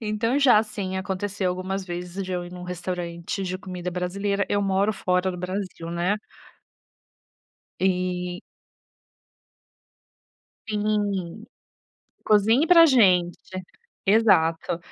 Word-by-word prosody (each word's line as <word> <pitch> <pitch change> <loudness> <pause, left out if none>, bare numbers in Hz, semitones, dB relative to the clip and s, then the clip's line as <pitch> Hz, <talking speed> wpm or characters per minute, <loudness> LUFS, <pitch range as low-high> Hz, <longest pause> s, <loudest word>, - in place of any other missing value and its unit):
então, 225 +4 0
já 245 -6 +6
sim, 200 -3 -5
aconteceu 190 0 -2
algumas 185 +1 -3
vezes 180 +2 -5
de 185 - -5
eu 180 -1 -2
ir 175 - -11
em - - -8
um 180 - -8
restaurante 175 0 -4
de 185 0 -3
comida 180 -2 -6
brasileira 200 +3 -1
eu 205 0 +1
moro 195 +2 +1
fora 180 0 0
do 180 - -6
Brasil, 180 -2 -5
né. 175 +5 0 1.6
E 180 -1 -1 2.3
Sim. 205 -2 -1 0.8
"Cozinhe 220 +8 +4
para 335 -1 +8
gente.". 185 - +4 0.7
Exato. 170 -7 +3
190 Hz, 110 wpm, -24 LUFS, 180-205 Hz, 2.3 s, para